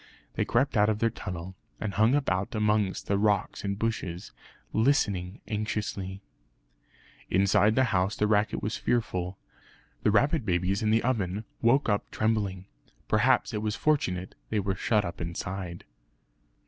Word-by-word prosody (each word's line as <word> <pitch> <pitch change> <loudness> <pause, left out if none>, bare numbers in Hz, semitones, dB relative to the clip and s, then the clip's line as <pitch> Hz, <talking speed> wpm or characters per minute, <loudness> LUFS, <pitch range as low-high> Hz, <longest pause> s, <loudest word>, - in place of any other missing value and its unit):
They - - 0
crept 130 +4 +1
out 105 +1 +5
of 110 - +1
their 115 +1 +1
tunnel, 90 -1 -6 0.3
and 105 -3 -3
hung 110 +6 +4
about 100 -8 0
amongst 105 -2 +1
the 100 0 +1
rocks 105 -2 +1
and 100 -1 -2
bushes, 105 -4 -3 0.4
listening 105 -7 +1
anxiously. 105 -2 -3 1.1
Inside 100 +3 +4
the 130 - +4
house 95 +2 +1
the 105 - +1
racket 105 0 +1
was 105 +3 -1
fearful. 95 -6 -1 0.6
The - - +3
rabbit 140 +8 +3
babies 95 +1 0
in 110 - +1
the 110 +1 +3
oven 110 -4 -1 0.2
woke 130 +5 +4
up 105 -2 0
trembling; 100 -4 -1 0.4
perhaps 115 +3 +3
it 105 - -2
was 105 0 -1
fortunate 95 -13 0 0.2
they 110 - +1
were 95 -1 0
shut 105 +2 +1
up 85 0 -6
inside. 85 +1 -5
105 Hz, 150 wpm, -28 LUFS, 95-110 Hz, 1.1 s, out